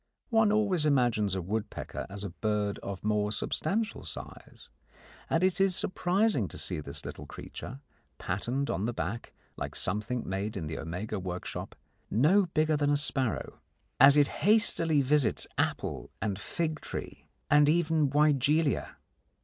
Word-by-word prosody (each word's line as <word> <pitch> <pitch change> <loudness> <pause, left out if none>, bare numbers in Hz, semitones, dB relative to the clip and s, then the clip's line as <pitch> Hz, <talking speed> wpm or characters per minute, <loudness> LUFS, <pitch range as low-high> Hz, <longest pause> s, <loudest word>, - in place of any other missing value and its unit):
One 220 -2 +4
always 205 -6 +2
imagines 120 -9 +2
a 95 - -2
woodpecker 105 +4 -4
as 100 +1 -6
a 100 - -4
bird 105 +1 -1
of 100 -1 -6
more 105 -1 +1
substantial 205 - -1
size, - - -10 0.6
and 165 - +2
it 185 0 +2
is 195 -2 +3
surprising 185 - +1
to - - -5
see 80 +2 -1
this 70 -2 -6
little - - -7
creature, 135 +3 -8 0.4
patterned 125 +10 -2
on 95 +5 -1
the 120 - -2
back 115 +1 -4 0.3
like - - -5
something 105 +5 -2
made 100 +2 -3
in 85 - -4
the 80 +1 -5
Omega 95 +6 -4
workshop, 90 -1 -5 0.3
no 175 - +4
bigger 155 -1 +1
than 145 -1 +1
a 145 - +3
sparrow, 135 -4 -1 0.4
as 140 +1 +8
it 145 -1 +6
hastily 165 -6 +4
visits 140 -2 +2
apple - - -2
and 100 -2 -2
fig 155 +5 -2
tree - - -7 0.2
and 145 0 +6
even 160 -2 +2
wygelia. 150 0 +2
135 Hz, 150 wpm, -29 LUFS, 105-160 Hz, 0.6 s, as